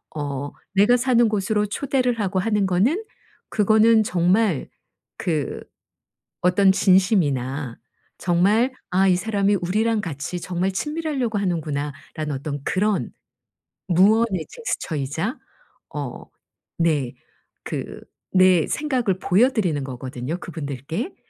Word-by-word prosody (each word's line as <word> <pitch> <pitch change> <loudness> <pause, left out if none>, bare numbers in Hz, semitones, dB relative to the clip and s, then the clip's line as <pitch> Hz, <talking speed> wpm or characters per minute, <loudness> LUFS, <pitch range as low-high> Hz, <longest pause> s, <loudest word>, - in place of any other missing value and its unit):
어 145 -1 -4 0.2
내가 210 +6 +5
사는 240 -2 +3
곳으로 210 0 0
초대를 250 0 0
하고 190 -2 0
하는 210 0 +1
거는 235 - +2 0.5
그거는 220 +1 +4
정말 185 - +1 0.5
그 155 -5 -2 0.8
어떤 190 +2 +4
진심이나 145 - +2 0.4
정말 205 +9 +2 0.2
'아 190 +1 +3
이 185 - +4
사람이 205 -1 +1
우리랑 215 +5 +1
같이 165 0 -5
정말 185 +1 -1
친밀하려고 295 -4 -2
하는구나.'라는 150 -4 -3
어떤 140 +1 -5
그런 205 +4 0 0.8
무언의 195 0 +3
제스처이자 165 - -3 0.6
어 - - -5 0.5
네 150 -7 +1 0.5
그 - - -5 0.3
내 185 -3 +5
생각을 250 -11 -1
보여 200 +8 +4
드리는 175 - 0
거거든요 130 +3 -5
그분들께. 160 - -5
185 Hz, 240 characters per minute, -23 LUFS, 155-220 Hz, 0.8 s, 내가